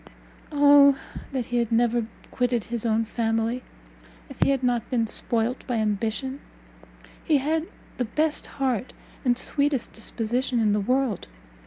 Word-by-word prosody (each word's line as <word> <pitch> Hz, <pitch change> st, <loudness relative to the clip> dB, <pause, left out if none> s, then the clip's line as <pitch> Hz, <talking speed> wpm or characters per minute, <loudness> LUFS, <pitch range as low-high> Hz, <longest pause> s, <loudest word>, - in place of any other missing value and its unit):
Oh 285 Hz, -1 st, +6 dB, 0.3 s
that 260 Hz, -3 st, -2 dB
he 245 Hz, -, -2 dB
had 235 Hz, -2 st, 0 dB
never 235 Hz, 0 st, +2 dB, 0.2 s
quitted 245 Hz, -3 st, 0 dB
his 235 Hz, 0 st, -3 dB
own 225 Hz, 0 st, +2 dB
family! 225 Hz, +2 st, -1 dB, 0.7 s
If -, -, -12 dB
he -, -, +4 dB
had 270 Hz, -2 st, +1 dB
not 240 Hz, -2 st, 0 dB
been 235 Hz, -3 st, +1 dB
spoilt 230 Hz, +2 st, 0 dB
by 245 Hz, -, -1 dB
ambition, 220 Hz, +5 st, -1 dB, 0.8 s
he 310 Hz, -4 st, +3 dB
had 315 Hz, +4 st, 0 dB, 0.3 s
the 250 Hz, -, 0 dB
best 305 Hz, +7 st, -1 dB
heart 260 Hz, -3 st, -1 dB, 0.3 s
and 245 Hz, -3 st, +2 dB
sweetest 280 Hz, -1 st, 0 dB
disposition 240 Hz, +3 st, -2 dB
in 215 Hz, -2 st, +3 dB
the 210 Hz, -, +2 dB
world. 255 Hz, -1 st, 0 dB
245 Hz, 145 wpm, -25 LUFS, 225-270 Hz, 0.8 s, Oh